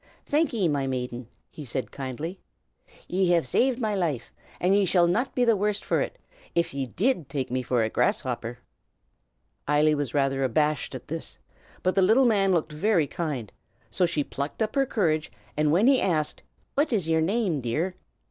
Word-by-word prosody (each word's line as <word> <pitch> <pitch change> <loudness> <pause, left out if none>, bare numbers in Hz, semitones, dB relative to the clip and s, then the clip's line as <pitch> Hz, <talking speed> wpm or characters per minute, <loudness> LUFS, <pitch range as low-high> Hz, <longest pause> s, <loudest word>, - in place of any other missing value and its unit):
"Thank 305 +2 +1
ye, 210 -8 +1
my 140 -3 0
maiden!" 125 -2 -4 0.2
he 155 - -9
said 130 0 -4
kindly. 140 +7 -5 0.7
"Ye 185 0 +1
have 170 -5 +2
saved 245 - +2
my 215 -3 0
life, 160 - -2 0.3
and 185 +2 +3
ye 205 - +4
shall 180 -2 +4
not 220 +10 0
be 250 - +3
the 230 -2 +4
worse 205 +1 0
for - - 0
it, - - -3 0.4
if 170 -2 +1
ye 135 -1 -2
did 185 - 0
take 135 -4 -3
me 130 0 0
for 125 -2 +1
a 110 - 0
grasshopper." 125 - -1 1.1
Eily 150 +1 +4
was 145 -4 -2
rather 135 -1 +1
abashed 150 +3 0
at 125 - -8
this, 160 +2 -5 0.5
but 185 - +2
the 195 - +3
little 220 +8 +5
man 200 -5 +3
looked 165 -3 +1
very 170 +1 +2
kind; 140 - -4 0.4
so 180 +10 +2
she 155 -4 0
plucked 140 +10 -3
up 215 - -3
her 275 -1 +2
courage, 160 - 0 0.2
and 150 0 +2
when 185 +8 +4
he 265 0 +5
asked, 155 -5 0 0.3
"What 290 +1 +1
is 195 -8 0
yer 160 0 +2
name, 195 -1 +1
my - - -4
dear?" 155 +10 -1
165 Hz, 190 wpm, -26 LUFS, 140-200 Hz, 1.1 s, little